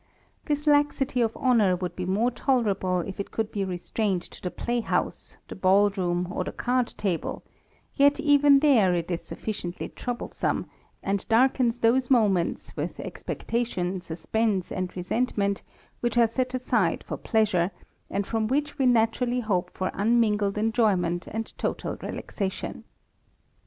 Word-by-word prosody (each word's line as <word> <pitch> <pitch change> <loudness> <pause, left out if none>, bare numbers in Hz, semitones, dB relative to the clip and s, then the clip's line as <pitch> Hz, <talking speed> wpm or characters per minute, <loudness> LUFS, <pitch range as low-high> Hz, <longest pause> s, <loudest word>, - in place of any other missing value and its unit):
This 295 -1 -1
laxity 290 -3 +2
of 225 -1 0
honour 225 -8 +3
would 180 -1 -4
be 180 -1 -4
more 215 +6 +2
tolerable, 210 -8 +1
if 190 +3 -7
it 200 - -3
could 220 -1 -2
be 200 - -1
restrained 190 +1 -1
to - - -13
the 180 - -2
play 240 +6 -2
house, 230 - -2
the - - -7
ball 195 +2 +4
room, 180 -2 -1
or - - -2
the - - -5
card 250 0 0
table; 185 -5 -2 0.5
yet 285 0 +4
even 285 -1 +5
there 225 -12 +5
it 170 +1 -2
is 170 - -1
sufficiently 185 -5 -5
troublesome, 245 -1 -3 0.4
and 195 0 -2
darkens 245 0 +3
those 245 +2 +2
moments 205 -9 +2
with - - -4
expectation, 190 -6 -3
suspense, 190 +3 -1
and 185 -1 -3
resentment, 200 +1 0 0.4
which 240 0 -1
are 235 - +7
set 255 +3 -1
aside 255 0 +1
for - - -5
pleasure, 210 -6 +1 0.4
and 200 +1 -1
from 220 0 -1
which 290 +4 -1
we 265 - +4
naturally 240 +1 +2
hope 195 -6 0
for 185 - -3
unmingled 210 -2 +2
enjoyment 200 -6 +1
and 225 0 -5
total - - -2
relaxation. 195 -2 -4
220 Hz, 145 wpm, -26 LUFS, 185-245 Hz, 0.5 s, are